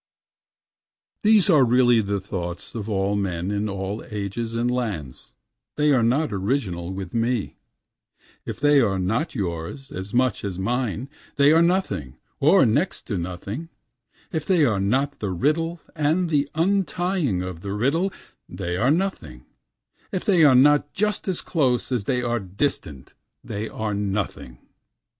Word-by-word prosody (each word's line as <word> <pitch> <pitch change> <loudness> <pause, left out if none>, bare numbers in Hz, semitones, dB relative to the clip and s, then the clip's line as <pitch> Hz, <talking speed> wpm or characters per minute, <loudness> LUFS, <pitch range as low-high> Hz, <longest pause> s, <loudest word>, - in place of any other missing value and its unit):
17 215 - +3
These 205 -2 +4
are 150 -5 +6
really 120 -1 +4
the 100 -1 -1
thoughts 90 -3 -6
of 110 -2 -5
all 100 0 0
men 95 -2 -2
in 105 +1 -1
all 100 +2 -4
ages 105 +2 -4
and 120 +1 +1
lands, 100 - -4 0.4
they 150 0 +3
are 130 -4 +4
not 125 +4 +1
original 95 -4 -2
with 95 -2 -6
me, 115 -2 -1 0.9
If - - -6
they 145 0 +5
are 100 -5 +1
not 110 - -1
yours 90 +6 -4
as 95 +2 -6
much 125 0 +1
as 95 -3 -4
mine 120 +4 -2 0.3
they 140 +1 +5
are 165 +1 +5
nothing, 170 - 0 0.2
or 155 +3 +5
next 140 - 0
to 100 - -1
nothing, 100 - -5 0.6
If 160 -2 -2
they 175 -3 +3
are 110 -7 +1
not 135 +9 0
the 105 - -2
riddle 160 - 0 0.2
and 165 +3 +1
the 145 -1 +1
untying 175 - 0
of 90 -3 -6
the 100 0 -4
riddle 145 - +1 0.4
they 90 +1 -3
are 120 +7 +2
nothing, 155 - -1 0.7
If 185 - -3
they 180 -5 +4
are 140 -4 +7
not 145 +3 +4
just 210 +1 0
as 185 -3 0
close 130 -7 0
as 120 -6 -1
they 125 0 0
are 120 -1 0
distant 95 - -3 0.3
they 105 +2 -4
are 110 -1 -3
nothing. 100 -11 -3
120 Hz, 155 wpm, -24 LUFS, 100-145 Hz, 0.9 s, are